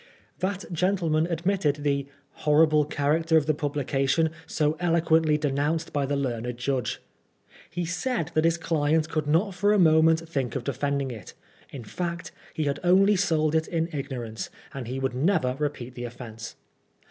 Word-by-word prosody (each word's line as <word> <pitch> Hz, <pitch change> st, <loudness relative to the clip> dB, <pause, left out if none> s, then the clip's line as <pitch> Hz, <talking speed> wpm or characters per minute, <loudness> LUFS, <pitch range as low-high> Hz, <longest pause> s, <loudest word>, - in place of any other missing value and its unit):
That 195 Hz, 0 st, -2 dB
gentleman 170 Hz, -2 st, +1 dB
ad 170 Hz, -1 st, -4 dB
mitted 150 Hz, -7 st, +1 dB
the 140 Hz, -1 st, 0 dB, 0.3 s
"horrible 155 Hz, 0 st, +4 dB
character 160 Hz, +3 st, +1 dB
of 155 Hz, -, +2 dB
the 155 Hz, -, +2 dB
publication, 145 Hz, +1 st, 0 dB, 0.2 s
so 150 Hz, 0 st, 0 dB
eloquently 165 Hz, -3 st, +3 dB
denounced 150 Hz, +2 st, -1 dB
by 140 Hz, -2 st, 0 dB
the 145 Hz, -, 0 dB
learned 125 Hz, -3 st, -2 dB
judge." 125 Hz, 0 st, -2 dB, 0.7 s
He 175 Hz, 0 st, -3 dB
said 175 Hz, -, -2 dB
that 155 Hz, -, +2 dB
his 165 Hz, 0 st, +3 dB
client 160 Hz, -1 st, +1 dB
could 155 Hz, -2 st, -2 dB
not 175 Hz, +7 st, +2 dB
for 205 Hz, +3 st, +2 dB
a -, -, +3 dB
moment 160 Hz, -1 st, +4 dB
think 135 Hz, -7 st, -2 dB
of 135 Hz, -, -2 dB
defend 140 Hz, +2 st, -1 dB
ing 130 Hz, -, -4 dB
it; 110 Hz, -5 st, -10 dB, 0.3 s
in 130 Hz, -4 st, -8 dB
fact, 170 Hz, -, -4 dB, 0.2 s
he 155 Hz, -, -1 dB
had 145 Hz, 0 st, -1 dB
only 195 Hz, +3 st, +5 dB
sold 155 Hz, -4 st, +1 dB
it 160 Hz, 0 st, +1 dB
in 165 Hz, -1 st, -1 dB
ignorance, 125 Hz, -6 st, -5 dB, 0.2 s
and 130 Hz, -4 st, -6 dB
he 130 Hz, +2 st, -4 dB
would 135 Hz, -1 st, -1 dB
never 135 Hz, -2 st, +1 dB
repeat 140 Hz, -4 st, -3 dB
the 120 Hz, -1 st, -6 dB
offence. 115 Hz, -2 st, -8 dB
155 Hz, 170 wpm, -26 LUFS, 140-165 Hz, 0.7 s, only